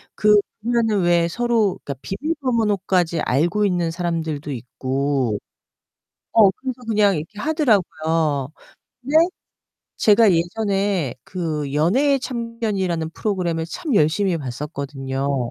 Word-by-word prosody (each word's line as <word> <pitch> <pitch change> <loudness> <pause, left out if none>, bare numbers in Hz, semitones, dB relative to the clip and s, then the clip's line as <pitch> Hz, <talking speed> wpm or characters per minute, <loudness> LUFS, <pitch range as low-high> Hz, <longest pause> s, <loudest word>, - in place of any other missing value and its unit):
그 210 0 +5 0.3
보면은 225 -4 +1
왜 170 -1 +3
서로 230 -2 +1
그러니까 140 - -3
비밀번호까지 205 - 0
알고 175 +11 +1
있는 175 -3 0
사람들도 165 -4 -3
있고 130 -2 -2 0.9
어 210 -4 +6
그래서 255 +3 -6
그냥 205 -4 +3
이렇게 165 +8 -7
하더라고요. 165 - +1 0.5
근데 280 +5 -3 0.8
제가 210 -1 +5
예전에 195 - 0
그 155 -6 -3
연애의 260 - +3
참견이라는 215 -10 -2
프로그램을 175 -5 -2
참 280 - -3
열심히 175 +2 +2
봤었거든요. 135 -1 -3
180 Hz, 275 characters per minute, -21 LUFS, 150-215 Hz, 0.9 s, 어